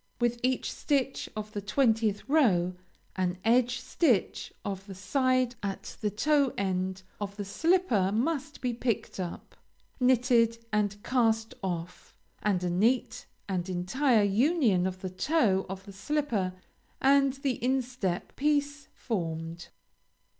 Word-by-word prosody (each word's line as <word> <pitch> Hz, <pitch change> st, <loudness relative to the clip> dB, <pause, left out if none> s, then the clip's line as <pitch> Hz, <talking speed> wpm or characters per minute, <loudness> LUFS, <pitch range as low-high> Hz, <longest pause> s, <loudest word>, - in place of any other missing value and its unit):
With 240 Hz, 0 st, +1 dB
each 255 Hz, 0 st, 0 dB
stitch 270 Hz, -2 st, -1 dB
of 215 Hz, 0 st, -5 dB
the 205 Hz, -, -4 dB
twentieth 220 Hz, -1 st, +1 dB
row, 200 Hz, -, +3 dB, 0.4 s
an 185 Hz, -1 st, -1 dB
edge 245 Hz, +1 st, +3 dB
stitch 250 Hz, -, +1 dB
of 195 Hz, 0 st, -4 dB
the 195 Hz, -, -8 dB
side 255 Hz, +5 st, +1 dB
at 195 Hz, -1 st, -5 dB
the 210 Hz, -, +1 dB
toe 280 Hz, +5 st, +2 dB
end 190 Hz, -1 st, -1 dB, 0.2 s
of 200 Hz, 0 st, -5 dB
the 205 Hz, -, -4 dB
slipper 240 Hz, -, +2 dB
must 285 Hz, +6 st, -1 dB
be 250 Hz, -2 st, 0 dB
picked 235 Hz, -4 st, -2 dB
up, 175 Hz, -2 st, -6 dB, 0.4 s
knitted 240 Hz, -2 st, +3 dB
and 205 Hz, -1 st, 0 dB
cast 225 Hz, -2 st, +1 dB
off, 180 Hz, -2 st, -5 dB, 0.3 s
and 195 Hz, -4 st, +1 dB
a 180 Hz, -, 0 dB
neat 225 Hz, +5 st, +1 dB, 0.2 s
and 185 Hz, -2 st, -2 dB
entire 215 Hz, +7 st, +2 dB
union 215 Hz, -, +3 dB
of 185 Hz, 0 st, -6 dB
the 185 Hz, -, -3 dB
toe 195 Hz, -, +1 dB
of 190 Hz, 0 st, -6 dB
the 200 Hz, -, -10 dB
slipper 210 Hz, -5 st, -1 dB, 0.4 s
and 275 Hz, 0 st, +4 dB
the 270 Hz, -4 st, -3 dB
instep 245 Hz, -8 st, -1 dB
piece 285 Hz, -1 st, 0 dB
formed. 165 Hz, -5 st, -4 dB
225 Hz, 130 wpm, -29 LUFS, 190-260 Hz, 0.4 s, and